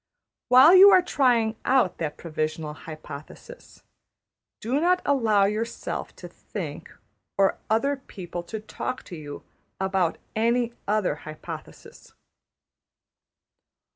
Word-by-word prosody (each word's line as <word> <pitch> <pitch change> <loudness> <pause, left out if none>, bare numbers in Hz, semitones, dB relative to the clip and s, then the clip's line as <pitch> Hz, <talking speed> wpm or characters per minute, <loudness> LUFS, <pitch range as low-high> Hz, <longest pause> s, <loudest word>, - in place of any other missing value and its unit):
While 260 +7 +8
you 380 +2 +10
are 370 -2 +6
trying 235 -9 +2
out 255 -8 +2
that 150 -2 -3
provisional 155 -1 -4
hypothesis, 155 - -11 0.8
do 250 +6 -1
not 360 +3 +3
allow 225 -8 +3
yourself 215 +3 -4
to - - -10
think, - - -8 0.5
or 195 -1 +2
other 275 +6 +1
people 180 -9 -8
to 220 +4 -6
talk 220 +4 -5
to 180 - -9
you, 145 -2 -9 0.4
about 190 -3 0 0.2
any 235 +2 +1
other 205 -7 0
hypothesis. 155 0 -11
220 Hz, 105 wpm, -25 LUFS, 170-260 Hz, 0.8 s, you